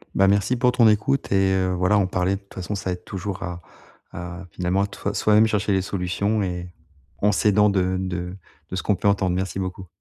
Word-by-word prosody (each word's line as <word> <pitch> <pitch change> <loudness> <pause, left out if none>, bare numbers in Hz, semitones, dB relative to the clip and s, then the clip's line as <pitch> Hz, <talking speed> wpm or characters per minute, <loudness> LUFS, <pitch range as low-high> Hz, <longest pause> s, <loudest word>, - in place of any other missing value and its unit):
Bah, 95 - +4
merci 100 +5 +2
pour 125 0 +3
ton 120 -3 +5
écoute 110 +5 +1
et 95 -1 +3
heu, 95 -1 +1
voilà, 90 +4 +2
en 100 - +3
parler, 90 +1 0
de - - -6
toute 100 - -20
façon, 95 +2 -4
ça 95 -2 -3
aide 90 - -5
toujours 95 0 -5
à 90 -1 -5 0.5
à 90 +1 -7
finalement, 90 +3 0
à - - +1
toi 100 - -4
soi-même 110 +1 +4
chercher 105 -1 0
les 95 -1 +2
solutions 100 +3 -1
et 90 -1 -4 0.5
en 105 - +5
s'aidant 105 +1 +3
de 95 -1 +1
de 90 -1 -4 0.3
de - - -4
ce 95 - -3
qu'on 105 - +2
peut 95 - -1
entendre. 95 -3 +2
Merci 95 +1 -2
beaucoup. 95 -1 -5
95 Hz, 220 wpm, -23 LUFS, 90-105 Hz, 0.5 s, ton